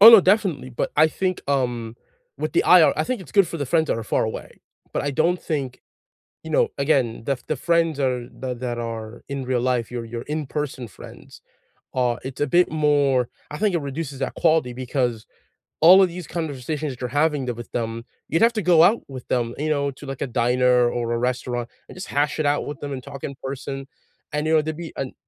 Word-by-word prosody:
Oh, 220 +3 +12
no, 225 -3 +10
definitely, 185 -9 +1
but 125 - -2
I 155 +2 +6
think, 185 +3 -2
um, 120 -4 -1 0.4
with - - -3
the - - +3
IR - - +7
I - - +2
think 255 -4 -2
it's 180 - -12
good 200 -4 +5
for 170 - -5
the 145 -3 -3
friends 160 +4 +2
that - - 0
are 115 - -5
far - - +1
away. 110 - -6 0.3
But - - -1
I 145 - -1
don't 170 +6 +1
think, 135 -5 -3 0.6
you 160 - -7
know, - - +3
again, 135 -6 +1
the 135 +1 0
the 155 - 0
friends 165 +1 +1
are 125 -2 0
that 125 -2 -4
that 120 -1 -3
are 115 -1 -6
in 140 -1 -4
real 125 -1 0
life, 125 -2 0
your 120 -1 -4
your 115 +1 -6
in-person 150 -4 -4
friends, - - -13 0.5
uh, 125 -2 +1
it's 130 0 -7
a 145 - +2
bit 175 +6 +3
more 145 -5 +2 0.2
I 150 - -6
think 210 -2 +1
it 170 - +1
reduces 140 -1 -5
that - - -2
quality 160 -7 +2
because 125 -2 -2 0.6
all 180 +4 +9
of 185 - +2
these 175 -1 -8
conversations 150 -2 -3
that 125 - -14
you're 125 - -2
having 150 -4 0
the 125 - -2
with 120 0 -9
them, 115 0 -3 0.2
you'd 165 - +1
have 235 +1 +5
to 215 - -1
go 175 -3 +6
out 230 - +4
with 130 -3 -9
them, 120 -2 0
you 155 +2 -2
know, 140 -2 +1
to, 135 +2 -12
like, 135 -1 -6
a - - 0
diner 125 0 +3
or 120 -1 -2
a - - 0
restaurant, 120 -1 -2 0.2
and - - -12
just 185 - -6
hash 145 +2 0
it 155 - +1
out 145 0 +1
with 145 - -6
them 145 - -5
and 130 -2 -6
talk 140 0 -9
in 140 - -6
person, 135 0 -5 0.5
and, 150 +1 -1
you 160 - +2
know, 155 - +5
to 155 +1 -3
be 165 +1 -8
an 135 -1 -4
140 Hz, 230 wpm, -23 LUFS, 125-155 Hz, 0.6 s, Oh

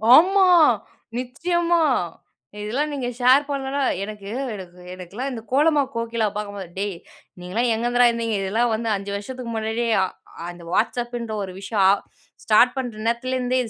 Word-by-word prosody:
ஆமா! 380 +4 +6 0.7
நிச்சயமா! 340 +7 0 0.8
இதெல்லாம் 270 +9 -1
நீங்க 265 -4 -3
ஷேர் 255 +3 +6
பண்ணலனா 275 0 -2 0.2
எனக்கு 210 -1 -8 0.3
எனக்கு 180 -2 -11
எனக்கெல்லாம் 190 +9 -5
இந்த 230 -3 -5
கோலமா 295 +2 +4
கோகிலாவ 230 -2 -1
பார்க்கும்போது, 200 -3 -5
டேய்! 200 -2 -2 0.4
நீங்கள்லாம் 215 +7 -1
எங்கேருந்துடா 240 +2 +3
இருந்தீங்க. 230 -2 -2
இதெல்லாம் 225 +5 +1
வந்து 225 +1 -2
5 200 +1 -5
வருஷத்துக்கு 235 +3 -6
முன்னாடியே, 225 +2 -1 0.2
அ - - +3 0.4
அந்த 175 -1 -10
WhatsAppன்ற 235 0 -1
ஒரு 190 - -6
விஷயம், 200 0 -1
ஆ - - +7 0.5
ஸ்டார்ட் 225 +3 +5
பண்ற 245 -3 -3
நேரத்துலேருந்தே 255 +2 0
இது 225 - -7
235 Hz, 140 wpm, -23 LUFS, 210-255 Hz, 0.8 s, ஆ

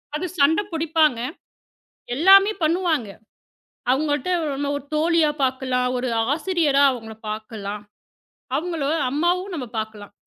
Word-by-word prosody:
அது 340 - -2
சண்டை 315 +7 +4
புடிப்பாங்க. 315 -5 +2 1.0
எல்லாமே 390 +6 +7
பண்ணுவாங்க. 320 - +1 0.8
அவங்கள்ட்ட 290 +3 0
நம்மளோட 285 -2 -2
ஒரு 285 - -10
தோழியா 320 0 +3
பாக்கலாம். 255 -1 0
ஒரு 250 +1 -2 0.3
ஆசிரியரா 310 -4 +2
அவங்கள 225 -3 -7
பாக்கலாம். 210 -1 -6 0.7
அவங்கள 335 -2 -3 0.3
அம்மாவும் 355 +6 0
நாம 275 -6 -4
பாக்கலாம். 215 -2 -6
290 Hz, 105 wpm, -22 LUFS, 250-330 Hz, 1.0 s, எல்லாமே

